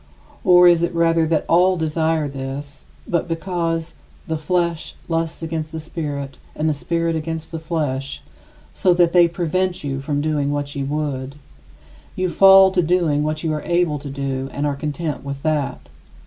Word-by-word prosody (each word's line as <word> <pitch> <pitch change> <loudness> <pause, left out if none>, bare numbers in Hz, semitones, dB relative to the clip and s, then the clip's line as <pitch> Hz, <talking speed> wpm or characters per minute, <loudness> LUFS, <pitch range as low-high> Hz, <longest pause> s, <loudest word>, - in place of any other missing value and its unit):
Or, 180 -3 +7
is 170 -1 +5
it 170 0 -1
rather 165 -1 +3
that 155 -1 0
all 180 +2 +4
desire 160 -1 0
this, 140 +1 -7 0.2
but 170 -1 0
because 165 -1 -2 0.3
"the 160 - -2
flesh 170 +1 -1
lusts 165 0 -2
against 160 -1 -4
the 160 - -5
spirit 145 -4 -5 0.2
and 155 - -1
the 155 - +2
spirit 165 +3 -1
against 160 0 -4
the 165 - -4
flesh," 145 -5 -3 0.5
so 180 -2 +2
that 175 -1 +3
they 175 -1 +6
"prevent 175 +1 -1
you 135 -1 -3
from 145 +1 -2
doing 145 -1 0
what 145 -1 -3
you 140 -1 -2
would," 140 -2 -3 0.8
you 185 0 0
fall 195 +1 +7
to 185 -1 +2
doing 165 -3 +1
what 155 +1 -2
you 160 -2 0
are 150 - -3
able 170 -2 0
to 140 0 -8
do 135 -1 -3
and 145 - -2
are 145 -1 0
content 150 +1 -4
with 140 0 -6
that. 155 -3 -1
160 Hz, 175 wpm, -21 LUFS, 145-170 Hz, 0.8 s, Or